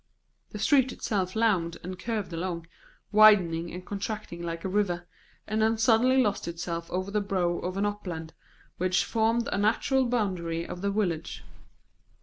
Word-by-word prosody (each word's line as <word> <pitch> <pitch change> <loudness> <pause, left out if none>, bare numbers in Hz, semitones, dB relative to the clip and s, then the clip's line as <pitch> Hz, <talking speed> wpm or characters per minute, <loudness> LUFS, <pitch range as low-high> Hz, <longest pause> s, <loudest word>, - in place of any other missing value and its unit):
The - - -7
street 265 -3 +3
itself 185 -4 -2
lounged 195 -7 +1
and 185 +1 -6
curved 215 -6 -3
along, 170 0 -3 0.5
widening 185 -6 +5
and 180 +1 -8
contracting 200 -3 -5
like 170 +1 -5
a - - +1
river, 185 -3 0 0.4
and 215 +1 -1
then 220 +1 +3
suddenly 240 +3 +4
lost 205 -8 +1
itself 170 0 -4
over 185 +2 -3
the 210 0 +1
brow 180 -3 0
of 185 +1 -4
an 200 - +1
upland 180 -6 -4 0.4
which 185 +1 +1
formed 230 +1 +1
a - - 0
natural 250 +5 +2
boundary 180 -8 -1
of 180 - -7
the 200 - 0
village. 170 - -2
195 Hz, 155 wpm, -28 LUFS, 175-215 Hz, 0.5 s, widening